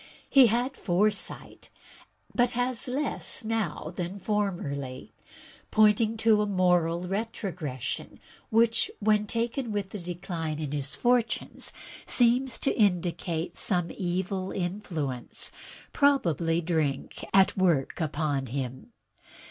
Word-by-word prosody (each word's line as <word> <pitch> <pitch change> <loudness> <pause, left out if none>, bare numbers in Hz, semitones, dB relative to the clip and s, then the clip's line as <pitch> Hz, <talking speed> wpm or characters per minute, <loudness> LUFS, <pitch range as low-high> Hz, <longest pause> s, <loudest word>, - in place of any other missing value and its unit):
He 270 -3 +7
had 245 +4 0
foresight, 200 +3 -1 0.6
but 245 0 +3
has 250 0 +1
less 270 0 -1
now 210 -8 -2
than 180 +2 -4
formerly, 175 -11 -3 0.6
pointing 215 +1 +4
to 220 -1 +4
a 210 - 0
moral 180 -2 +2
retrogression, 185 - -4 0.3
which, 230 +1 +3
when 210 0 +2
taken 235 +2 -1
with 205 -2 -2
the 210 - -5
decline 170 -3 -4
of 150 -3 -3
his 145 0 -1
fortunes, 240 -2 0 0.4
seems 245 +1 +4
to - - +1
indicate 175 -4 0
some 175 -4 0
evil 185 +1 -2
influence, 175 -9 -3 0.4
probably 170 - +2
drink, 155 -5 -1
at 195 -1 +5
work 170 -6 +1
upon 145 -3 -1
him. 130 - -5
190 Hz, 110 wpm, -28 LUFS, 165-225 Hz, 0.6 s, He